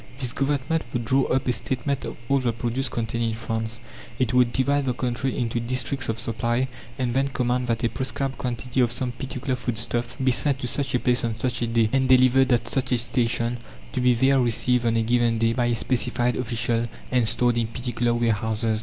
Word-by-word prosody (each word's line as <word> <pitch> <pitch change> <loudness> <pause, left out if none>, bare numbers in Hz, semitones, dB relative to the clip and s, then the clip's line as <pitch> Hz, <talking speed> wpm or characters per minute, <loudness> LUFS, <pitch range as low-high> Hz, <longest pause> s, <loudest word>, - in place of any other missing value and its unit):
This 125 -3 0
Government 145 +3 0
would 120 -2 -2
draw 135 +4 +3
up 130 +1 0
a 125 - +3
statement 135 +3 -2
of - - -6
all 140 +1 +3
the 125 -2 0
produce 120 +3 -2
contained 115 0 -2
in 115 -1 -1
France. 115 0 -4 0.4
It 125 -3 0
would 125 -1 +4
divide 140 +2 +1
the 125 -2 -1
country 125 +1 -2
into 120 -1 -1
districts 130 +2 -1
of 110 - -1
supply, 120 +3 -1 0.3
and 125 -2 -1
then 135 +2 +2
command 125 -2 -1
that 115 0 -1
a - - +4
prescribed 135 +1 -3
quantity 125 +1 -3
of 120 -2 +2
some 125 0 -2
particular 130 +1 -3
foodstuff 120 0 -2
be 130 -1 +2
sent 140 +3 +1
to 130 - -5
such 140 +1 -1
a - - +2
place 125 0 +1
on 115 -1 -1
such 120 +1 -1
a 120 - +1
day, 115 -1 +2
and 135 -1 +2
delivered 130 +1 +5
at 120 -1 +2
such 130 +3 -1
a - - +3
station, 120 0 0 0.4
to - - -1
be 125 -1 +4
there 135 +3 +3
received 120 0 +2
on 115 0 +2
a 115 - +2
given 120 0 +2
day 115 0 +2
by 120 0 +1
a 120 - +1
specified 125 0 0
official 120 -1 0 0.2
and 125 -4 +3
stored 120 +1 +2
in 115 - 0
particular 120 0 -1
warehouses. 110 -1 0
120 Hz, 215 wpm, -24 LUFS, 115-130 Hz, 0.4 s, delivered